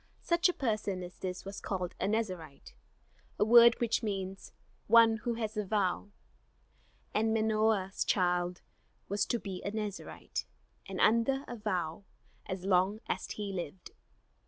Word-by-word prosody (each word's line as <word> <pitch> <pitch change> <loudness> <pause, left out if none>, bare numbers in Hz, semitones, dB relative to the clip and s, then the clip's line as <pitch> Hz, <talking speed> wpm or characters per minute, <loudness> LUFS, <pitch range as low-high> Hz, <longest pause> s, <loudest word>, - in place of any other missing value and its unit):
Such 345 +1 +3
a - - 0
person 210 - -1
as 175 +1 -10
this 185 0 -5
was 195 +1 -7
called 185 -3 -3
a 190 - 0
Nazarite, 185 -10 -3 0.6
a - - +3
word 235 +1 +8
which 235 -2 +1
means 195 -3 -4 0.4
"one 225 0 +7
who 235 +2 -2
has 220 -1 -3
a 210 - 0
vow"; 200 -1 0 1.0
and 220 +1 +2
Manoah's 215 -3 +1
child 180 -2 +1 0.5
was 200 +1 0
to 240 - +1
be 195 -5 -6
a - - -2
Nazarite, 210 -2 -5 0.4
and 190 -1 -5
under 235 +5 +3
a 240 - -5
vow, 190 -4 -2 0.4
as 185 -1 -4
long 190 +2 +3
as - - -3
he 205 -2 -4
lived. 180 -1 -6
205 Hz, 145 wpm, -32 LUFS, 185-220 Hz, 1.0 s, word